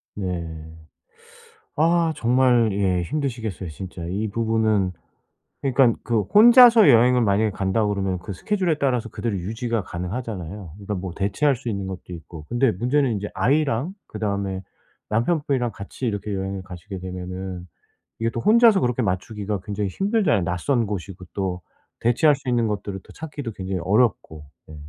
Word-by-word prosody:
네. 85 -5 -5 1.0
아 165 +1 +3
정말 120 -1 +3
예 95 -3 +1
힘드시겠어요 115 - -3
진짜 90 +1 -8
이 100 +5 -2
부분은. 110 -3 +1 0.7
그니깐 130 -3 +3
그 115 -3 +2
'혼자서 230 - +8
여행을 125 0 +5
만약에 105 +1 +2
간다.' 100 +2 0
그러면 100 -2 -1
그 100 - -8
스케줄에 175 - -1
따라서 125 -5 0
그대로 110 0 -3
유지가 115 +4 -2
가능하잖아요. 95 -1 -6
그러니까 100 +1 -5
뭐 90 -1 -5
대체할 105 +9 +1
수 125 - -10
있는 100 -4 -2
것도 95 -1 -7
있고. 80 -2 -10
근데 120 0 +2
문제는 125 +7 +1
인제 105 -1 -3
아이랑 145 +3 +1
그다음에 100 -3 -3 0.5
남편분이랑 125 +1 0
같이 100 +6 -7
이렇게 105 -1 -3
여행을 95 0 -3
가시게 95 +1 -8
되면은 90 0 -6 0.5
이게 115 0 0
또 115 - -4
혼자서 225 - +5
그렇게 125 0 0
맞추기가 100 +1 -2
굉장히 100 0 -3
힘들잖아요. 195 - +1
낯선 100 +8 0
곳이고 95 -2 -6
또 95 -2 -2 0.4
대체할 135 +6 +4
수 135 -1 -9
있는 120 -2 +2
것들을 100 -2 -3
또 - - -15
찾기도 145 -6 -6
굉장히 95 -1 -4
어렵고. 100 -7 +1 0.2
네. 80 - -12
105 Hz, 360 characters per minute, -23 LUFS, 95-125 Hz, 1.0 s, 혼자서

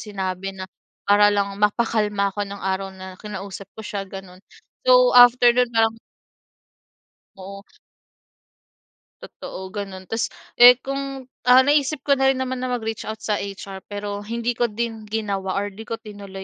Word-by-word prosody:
sinabi 195 -2 -4
na 185 - -6 0.4
para 205 0 +6
lang 200 -1 0
mapakalma 210 -2 +1
ako 205 +1 -3
no'ng 200 0 -8
araw 190 0 -1
na 185 0 -10
kinausap 195 -2 -7
ko - - -8
siya 200 -3 -5
gano'n, 190 -2 -10 0.5
so - - +6
after 245 0 +7
no'n 250 0 +3
parang 225 0 +3 1.4
Oo. 195 +1 -10 1.6
Totoo 190 0 -9
gano'n, 195 -3 -6
tapos, 225 0 0 0.3
eh, 245 +1 +10
kung, 275 -1 -4 0.2
ah, 255 +1 +8
naisip 290 +1 +1
ko 280 - +3
na 270 - +3
rin 270 - +2
naman 260 -1 -3
na 255 - -3
mag-reach 225 -3 -4
out 220 0 -5
sa 210 -1 -1
HR 195 -1 -7
pero 205 0 -5
hindi 230 +3 -3
ko 240 0 0
din 225 0 -5
ginawa 200 -3 -3
or 205 +1 -2
'di 220 +3 -11
ko 230 - -3
tinuloy 200 -3 -10
210 Hz, 155 wpm, -22 LUFS, 195-240 Hz, 1.6 s, eh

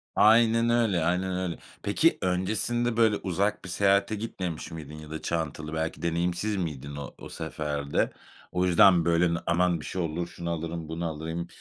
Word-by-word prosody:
Aynen 115 +2 +5
öyle, 110 -8 +2
aynen 90 +1 0
öyle. 90 -3 -2 0.3
Peki, - - +3
öncesinde 110 +6 0
böyle, 110 -2 +4
uzak 100 +3 -1
bir - - -7
seyahate 100 +3 +2
gitmemiş 90 -7 -5
miydin 75 -2 -8
ya 75 -1 -10
da 80 - -5
çantalı, 80 -2 -3
belki 80 +1 -2
deneyimsiz 85 +5 0
miydin 70 -6 -4
o 70 - -7
o - - -9
seferde? 75 -3 -2 0.4
O 90 0 +1
yüzden, 90 -1 +6
böyle, 85 0 +3 0.2
"Aman 85 0 +2
bir - - -8
şey 95 - -3
olur, 85 +1 -2
şunu 85 0 -6
alırım, 85 -1 -4
bunu 85 +1 -3
alıyım." 80 +2 -4
85 Hz, 165 wpm, -27 LUFS, 80-95 Hz, 0.4 s, yüzden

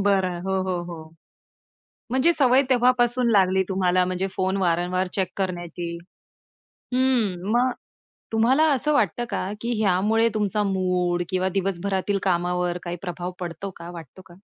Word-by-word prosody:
बरं. 190 -3 +1
हो, 190 0 -1
हो, 180 -2 -2
हो. 160 -1 -10 1.0
म्हणजे 265 +7 +3
सवय 265 -3 +4
तेव्हापासून 245 -1 +3
लागली 190 -3 +4
तुम्हाला 185 -1 +2
म्हणजे 185 +1 -1
फोन 190 +1 0
वारंवार 180 0 +1
चेक 190 -2 0
करण्याची. 175 -2 -4 1.0
हम्म, 225 -8 +1
मग 250 +2 +3 0.6
तुम्हाला 245 +7 +3
असं 300 +3 +1
वाटतं 240 -4 +1
का, 195 -1 -2
की 235 +1 -2
ह्यामुळे 210 +4 +3
तुमचा 210 0 0
मूड 180 -2 0
किंवा 185 0 0
दिवसभरातील 195 +1 -1
कामावर 180 -1 0
काही 175 0 -4
प्रभाव 175 0 -5
पडतो 180 +2 -5
का 170 - -8
वाटतो 170 +1 -11
का? 175 - -16
190 Hz, 135 wpm, -24 LUFS, 180-220 Hz, 1.0 s, सवय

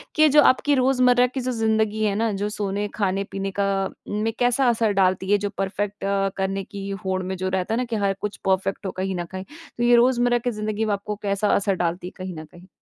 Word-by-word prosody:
कि 310 0 +6
जो 295 +1 +6
आपकी 285 +3 +4
रोज़मर्रा 250 -1 +4
की 255 +2 -5
जो 255 +1 -2
ज़िंदगी 220 -2 0
है 205 -2 +1
ना 225 +1 +1
जो 205 +1 -1
सोने, 205 0 -2
खाने-पीने 195 -1 -2
का 195 -1 +1 0.2
में 215 +2 -1
कैसा 245 +2 +3
असर 225 -2 +2
डालती 190 0 +1
है? 205 - +6
जो 205 0 -3
परफ़ेक्ट 200 +1 -3
अ, 195 0 +1
करने 195 0 -1
की 200 -1 -7 0.2
होड़ 185 0 0
में 190 +1 -3
जो 185 +1 -2
रहता 190 +3 -1
है - - +1
ना? 250 - 0
कि 235 -1 -3
हर 200 -2 +1
कुछ 210 -1 -4
परफ़ेक्ट 195 +1 0
हो 190 - -2
कहीं 190 0 -3
न 175 -1 -3
कहीं, 185 0 -5 0.3
तो 240 - -1
ये 240 0 +6
रोज़मर्रा 240 0 +4
की 245 +1 -2
ज़िंदगी 215 0 -2
में 210 - 0
आपको 205 +1 -4
कैसा 200 +1 0
असर 200 -1 +1
डालती 175 0 -2
है - - -8
कहीं 185 -1 -6
न 155 - -8
कहीं? 175 +4 -17
205 Hz, 240 wpm, -23 LUFS, 195-230 Hz, 0.3 s, कि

